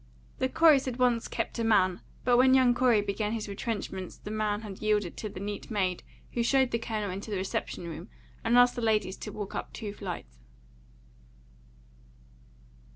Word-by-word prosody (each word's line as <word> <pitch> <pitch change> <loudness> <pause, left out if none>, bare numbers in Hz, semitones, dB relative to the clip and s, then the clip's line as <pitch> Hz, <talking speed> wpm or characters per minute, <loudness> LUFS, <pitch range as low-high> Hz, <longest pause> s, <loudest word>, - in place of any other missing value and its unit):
The 260 - +1
Coreys 310 -3 +5
had 255 -2 -3
once 245 -2 +2
kept - - -3
a - - +1
man, 190 -5 +3 0.2
but 245 0 +4
when 260 +1 +6
young 255 -2 +5
Corey 240 -3 +4
began 205 +1 -2
his 220 -2 -3
retrenchments 200 -3 -4
the 210 - -8
man 215 -1 -1
had 205 -3 -8
yielded 210 -4 +1
to 215 - -4
the 190 - -8
neat 205 +1 -5
maid 190 -5 0 0.3
who 240 - -1
showed 260 +1 +3
the 230 - 0
Colonel 215 -3 -3
into 195 +4 -6
the 205 - -1
reception 185 -2 -3
room 165 +4 -7 0.3
and 235 +1 +3
asked 245 0 +6
the 245 - -3
ladies 215 -4 +1
to - - -7
walk 205 -2 -6
up - - -5
two 205 -2 -5
flights. 175 - -7
215 Hz, 180 wpm, -29 LUFS, 200-240 Hz, 0.3 s, when